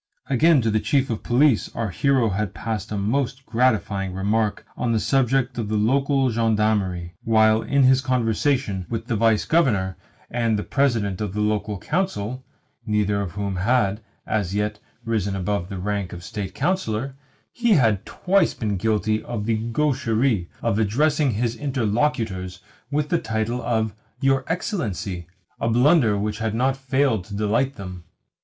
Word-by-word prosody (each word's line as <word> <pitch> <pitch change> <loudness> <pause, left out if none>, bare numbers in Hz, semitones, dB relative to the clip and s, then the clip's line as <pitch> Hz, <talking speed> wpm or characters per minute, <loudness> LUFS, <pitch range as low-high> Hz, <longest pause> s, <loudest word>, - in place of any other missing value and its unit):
Again, 145 +1 +4
to 110 - +1
the 110 - +2
Chief 135 +2 +1
of 110 - -3
Police 125 -1 +3
our 115 -4 -2
hero 130 0 +2
had 100 -1 -2
passed 110 +1 -4
a 105 - -2
most 130 +5 -1
gratifying 110 -5 0
remark 105 +2 0
on 120 -2 -1
the 110 - +2
subject 130 0 +1
of 110 -3 -3
the 110 - 0
local 135 +4 +2
gendarmery; 105 -6 0
while 110 -1 +4
in 140 -1 +2
his 130 0 +5
conversation 125 -4 0
with 115 -1 -3
the 120 - -1
Vice 110 0 +2
Governor 105 - +1 0.3
and 115 -2 +1
the 105 - -2
President 115 -9 0
of 105 -3 -3
the - - -2
Local 105 -1 0
Council 130 - -2 0.4
(neither 105 -2 0
of 95 -4 -5
whom 100 -2 -3
had, 105 0 +1 0.2
as 100 -3 -1
yet, 105 0 -1 0.3
risen 105 -4 -1
above 95 -1 -2
the 100 - -5
rank 100 0 -3
of 85 - -8
State 100 -2 -5
Councillor) 135 - -1 0.4
he 235 -2 +2
had 110 - +3
twice 185 -2 +1
been 105 -4 -2
guilty 110 +1 0
of 110 -4 -4
the 115 -1 +1
gaucherie 120 - +1
of 100 - +1
addressing 140 +5 +2
his 115 +1 -1
interlocutors 115 -8 -1 0.3
with 150 +1 -1
the 170 - +2
title 110 +3 -2
of 110 -3 0 0.3
"Your 135 -1 +2
Excellency" 105 - -3 0.3
a 115 - 0
blunder 120 -2 +4
which 105 +1 -2
had 110 -1 -1
not 130 +3 +2
failed 135 -5 +1
to 100 - -8
delight 115 +6 0
them. 90 -5 -8
110 Hz, 160 wpm, -23 LUFS, 105-130 Hz, 0.4 s, his